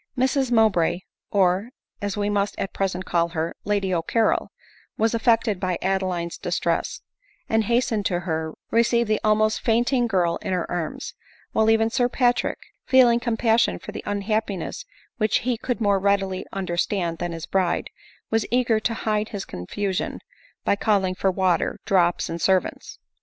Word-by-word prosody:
Mrs 260 Hz, 0 st, +1 dB
Mowbray, 195 Hz, -7 st, +3 dB, 0.3 s
or, 195 Hz, +2 st, +2 dB, 0.3 s
as 205 Hz, 0 st, -3 dB
we 205 Hz, 0 st, 0 dB
must 205 Hz, 0 st, 0 dB
at 195 Hz, -, -3 dB
present 190 Hz, -1 st, -2 dB
call 170 Hz, -1 st, +1 dB
her, 165 Hz, 0 st, -2 dB
Lady 200 Hz, -2 st, 0 dB
CCarrol, 185 Hz, +6 st, +1 dB, 0.5 s
was 225 Hz, +1 st, +2 dB
affected 225 Hz, -3 st, +2 dB
by 185 Hz, -2 st, -1 dB
Adeline's 185 Hz, -3 st, -1 dB
distress, -, -, -1 dB, 0.4 s
and 220 Hz, -1 st, +1 dB
hastening 235 Hz, -2 st, +1 dB
to 175 Hz, -3 st, 0 dB
her, 160 Hz, -2 st, -3 dB, 0.2 s
received 235 Hz, 0 st, +3 dB
the 215 Hz, 0 st, +1 dB
almost 215 Hz, 0 st, +2 dB
fainting 240 Hz, +2 st, +2 dB
girl 180 Hz, -5 st, +1 dB
in -, -, -4 dB
her 180 Hz, -2 st, 0 dB
arms; 175 Hz, -3 st, -4 dB, 0.4 s
while 220 Hz, 0 st, +3 dB
even 225 Hz, 0 st, +3 dB
Sir 245 Hz, 0 st, +2 dB
Patrick, 245 Hz, -1 st, +1 dB, 0.3 s
feeling 245 Hz, -3 st, +5 dB
compassion 230 Hz, -1 st, +2 dB
for -, -, -9 dB
the -, -, -6 dB
unhappiness 205 Hz, -, -2 dB, 0.3 s
which 215 Hz, -2 st, +2 dB
he 250 Hz, 0 st, 0 dB
could 245 Hz, +1 st, -3 dB
more 200 Hz, -3 st, +2 dB
readily 195 Hz, -1 st, 0 dB
under 185 Hz, -3 st, -3 dB
stand 175 Hz, -3 st, -1 dB
than 175 Hz, 0 st, -2 dB
his 165 Hz, -1 st, -6 dB
bride, 185 Hz, -3 st, 0 dB, 0.4 s
was 225 Hz, -1 st, +1 dB
eager 245 Hz, -3 st, +2 dB
to 230 Hz, +1 st, -1 dB
hide 215 Hz, 0 st, 0 dB
his 200 Hz, -2 st, -5 dB
confusion 190 Hz, -, -3 dB, 0.5 s
by -, -, +3 dB
calling 200 Hz, -3 st, +1 dB
for 190 Hz, +1 st, 0 dB
water, 185 Hz, -2 st, +1 dB
drops, 175 Hz, -3 st, +2 dB
and 165 Hz, 0 st, -5 dB
servants. 190 Hz, -1 st, 0 dB
205 Hz, 160 wpm, -24 LUFS, 185-225 Hz, 0.5 s, feeling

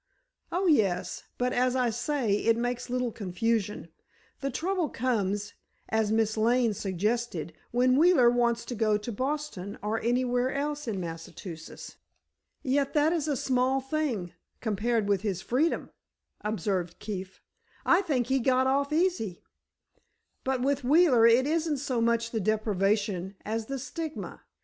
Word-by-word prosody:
"Oh, 370 Hz, +3 st, 0 dB
yes; 205 Hz, -, +1 dB
but, 250 Hz, 0 st, 0 dB
as 255 Hz, +1 st, +2 dB
I 250 Hz, -2 st, +2 dB
say, 240 Hz, -1 st, 0 dB
it 230 Hz, +1 st, +2 dB
makes 245 Hz, +1 st, -2 dB
little 250 Hz, -1 st, -1 dB
confusion. 205 Hz, -1 st, -2 dB, 0.5 s
The 275 Hz, -, -2 dB
trouble 345 Hz, +4 st, -1 dB
comes, 205 Hz, -5 st, -1 dB, 0.4 s
as 220 Hz, -1 st, +1 dB
Miss 220 Hz, -1 st, +2 dB
Lane 235 Hz, +1 st, +3 dB
suggested, 195 Hz, -3 st, -2 dB, 0.2 s
when 255 Hz, +1 st, +3 dB
Wheeler 295 Hz, -6 st, +6 dB
wants 235 Hz, -1 st, +1 dB
to -, -, -5 dB
go 215 Hz, -2 st, +2 dB
to 210 Hz, +3 st, -6 dB
Boston 260 Hz, -5 st, -3 dB
or 215 Hz, +2 st, -1 dB
anywhere 245 Hz, +1 st, +1 dB
in 280 Hz, -6 st, -2 dB
Massachusetts." 165 Hz, 0 st, -8 dB, 0.7 s
"Yet 275 Hz, +2 st, 0 dB
that 300 Hz, +2 st, +4 dB
is 315 Hz, -3 st, -1 dB
a 290 Hz, -3 st, 0 dB
small 260 Hz, +2 st, +1 dB
thing, 265 Hz, -, -2 dB, 0.3 s
compared 220 Hz, 0 st, 0 dB
with 200 Hz, -2 st, +2 dB
his 195 Hz, -4 st, -2 dB
freedom," 290 Hz, +7 st, 0 dB, 0.5 s
observed 195 Hz, -4 st, -2 dB
Keefe; 195 Hz, -3 st, -6 dB, 0.5 s
"I 355 Hz, +3 st, +5 dB
think 280 Hz, -10 st, 0 dB
he 265 Hz, +2 st, +1 dB
got 260 Hz, +1 st, +3 dB
off 280 Hz, +2 st, +1 dB
easy." 315 Hz, -, 0 dB, 1.0 s
"But 260 Hz, -1 st, 0 dB
with 280 Hz, 0 st, +1 dB
Wheeler 265 Hz, -4 st, +5 dB
it 235 Hz, +3 st, +5 dB
isn't 315 Hz, 0 st, 0 dB
so 260 Hz, -3 st, -1 dB
much 230 Hz, 0 st, +1 dB
the 225 Hz, -, -1 dB
deprivation 200 Hz, -2 st, 0 dB
as 220 Hz, +1 st, -2 dB
the 275 Hz, -, -3 dB
stigma. 315 Hz, +4 st, -6 dB
240 Hz, 140 wpm, -28 LUFS, 210-270 Hz, 1.0 s, Wheeler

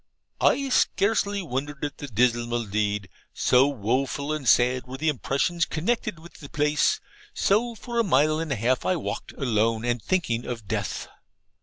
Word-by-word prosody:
I 275 Hz, -1 st, +2 dB
scarcely 200 Hz, -4 st, +1 dB
wondered 145 Hz, 0 st, -3 dB
at 145 Hz, -, -6 dB
the 145 Hz, -, -6 dB
dismal 120 Hz, 0 st, +1 dB
deed, 105 Hz, -1 st, -1 dB, 0.3 s
so 130 Hz, +2 st, +4 dB
woful 135 Hz, +4 st, -1 dB
and 145 Hz, -6 st, 0 dB
sad 125 Hz, +1 st, +3 dB
were 130 Hz, +1 st, -6 dB
the 155 Hz, +3 st, +1 dB
impressions 150 Hz, +5 st, 0 dB
connected 210 Hz, +4 st, -1 dB
with 165 Hz, +2 st, -14 dB
the 145 Hz, -, -10 dB
place. 150 Hz, -1 st, +2 dB, 0.4 s
So, 230 Hz, +4 st, +1 dB
for 235 Hz, +1 st, -4 dB
a -, -, +4 dB
mile 155 Hz, -, +3 dB
and 165 Hz, -2 st, -3 dB
a -, -, +1 dB
half 125 Hz, +3 st, +1 dB
I 185 Hz, -, +1 dB
walked 170 Hz, -, -4 dB
alone 115 Hz, -3 st, 0 dB
and 120 Hz, -1 st, 0 dB
thinking 120 Hz, -, 0 dB
of 115 Hz, -4 st, -6 dB
death. -, -, -3 dB
140 Hz, 165 wpm, -25 LUFS, 120-170 Hz, 0.4 s, so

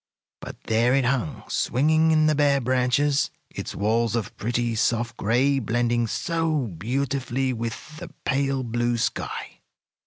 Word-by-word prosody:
But -, -, -9 dB
there 115 Hz, +3 st, +2 dB
it 135 Hz, -2 st, +2 dB
hung, 125 Hz, -2 st, -1 dB
swinging 155 Hz, +6 st, +2 dB
in 155 Hz, -1 st, +4 dB
the 155 Hz, -, +4 dB
bare 140 Hz, -1 st, +3 dB
branches, 130 Hz, +3 st, +1 dB, 0.2 s
its -, -, -6 dB
walls 115 Hz, +2 st, +1 dB
of 115 Hz, -4 st, -3 dB
pretty, 120 Hz, +1 st, -1 dB
soft 115 Hz, +1 st, 0 dB
gray 130 Hz, +6 st, +2 dB
blending 120 Hz, 0 st, 0 dB
so 165 Hz, +1 st, -1 dB
beautifully 130 Hz, +6 st, -2 dB
with 115 Hz, +6 st, -6 dB
the -, -, -7 dB, 0.2 s
pale 135 Hz, -1 st, 0 dB
blue 120 Hz, 0 st, 0 dB
sky. -, -, -3 dB
125 Hz, 135 wpm, -24 LUFS, 115-140 Hz, 0.2 s, in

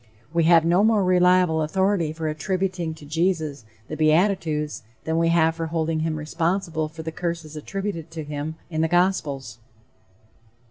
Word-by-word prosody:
We 170 Hz, -1 st, +2 dB
have 165 Hz, -1 st, +6 dB
no 175 Hz, +4 st, +4 dB
more 220 Hz, -2 st, +4 dB
reliable 180 Hz, -2 st, +4 dB
authority 185 Hz, +1 st, +1 dB
for 160 Hz, 0 st, -4 dB
attributing 175 Hz, +1 st, -2 dB
to 155 Hz, -, -13 dB
Jesus 160 Hz, -5 st, -1 dB, 0.2 s
the 155 Hz, -, -5 dB
beatitudes 155 Hz, -1 st, +1 dB, 0.2 s
than 160 Hz, +1 st, 0 dB
we 165 Hz, -, +3 dB
have 165 Hz, -1 st, +3 dB
for 165 Hz, 0 st, -4 dB
holding 160 Hz, 0 st, -1 dB
him 160 Hz, 0 st, -1 dB
responsible 160 Hz, +1 st, -1 dB
for 160 Hz, +1 st, -9 dB
the 160 Hz, -, -4 dB
curses 165 Hz, -2 st, -4 dB
attributed 180 Hz, 0 st, -4 dB
to 160 Hz, -1 st, -6 dB
him 150 Hz, +1 st, -5 dB, 0.2 s
in 155 Hz, -1 st, -1 dB
the 160 Hz, -, +2 dB
gospels. 150 Hz, -, 0 dB
165 Hz, 155 wpm, -24 LUFS, 155-180 Hz, 0.2 s, have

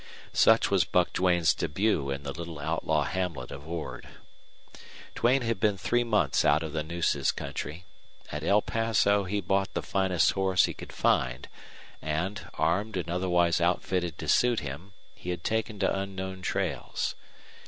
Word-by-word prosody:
Such -, -, +5 dB
was -, -, +4 dB
Buck 90 Hz, -1 st, +1 dB
Duane's 90 Hz, -3 st, +3 dB
debut 85 Hz, -2 st, 0 dB
in 70 Hz, 0 st, -3 dB
the 70 Hz, -, -4 dB
little 85 Hz, +1 st, -7 dB
outlaw 80 Hz, 0 st, 0 dB
hamlet 90 Hz, 0 st, -3 dB
of 70 Hz, +2 st, -9 dB
Ord. 85 Hz, -1 st, -5 dB, 1.1 s
Duane 125 Hz, +3 st, +2 dB
had 115 Hz, -4 st, -1 dB
been 105 Hz, -1 st, +2 dB
three 120 Hz, +5 st, +1 dB
months 105 Hz, -, +2 dB
out 75 Hz, +2 st, +3 dB
of 80 Hz, -2 st, -5 dB
the 80 Hz, -, -1 dB
Nueces 85 Hz, +2 st, 0 dB
country. 75 Hz, +5 st, -6 dB, 0.5 s
At 75 Hz, +1 st, -4 dB
El 100 Hz, +5 st, +3 dB
Paso 105 Hz, -3 st, +2 dB
he 100 Hz, +2 st, -1 dB
bought 95 Hz, +1 st, 0 dB
the -, -, -1 dB
finest 95 Hz, -3 st, +2 dB
horse 95 Hz, -2 st, +3 dB
he -, -, -4 dB
could -, -, -10 dB
find, 65 Hz, -1 st, +1 dB, 0.5 s
and, 90 Hz, +6 st, -3 dB
armed 100 Hz, +4 st, 0 dB
and 85 Hz, -1 st, -3 dB
otherwise 90 Hz, -1 st, +2 dB
outfitted 90 Hz, -1 st, 0 dB
to -, -, -6 dB
suit 120 Hz, -2 st, +3 dB
him, 75 Hz, +8 st, -7 dB, 0.2 s
he 90 Hz, -, -9 dB
had 90 Hz, -1 st, -3 dB
taken 110 Hz, -1 st, -1 dB
to 100 Hz, -1 st, +1 dB
unknown 95 Hz, -1 st, -4 dB
trails. -, -, -2 dB
90 Hz, 160 wpm, -28 LUFS, 80-100 Hz, 1.1 s, Such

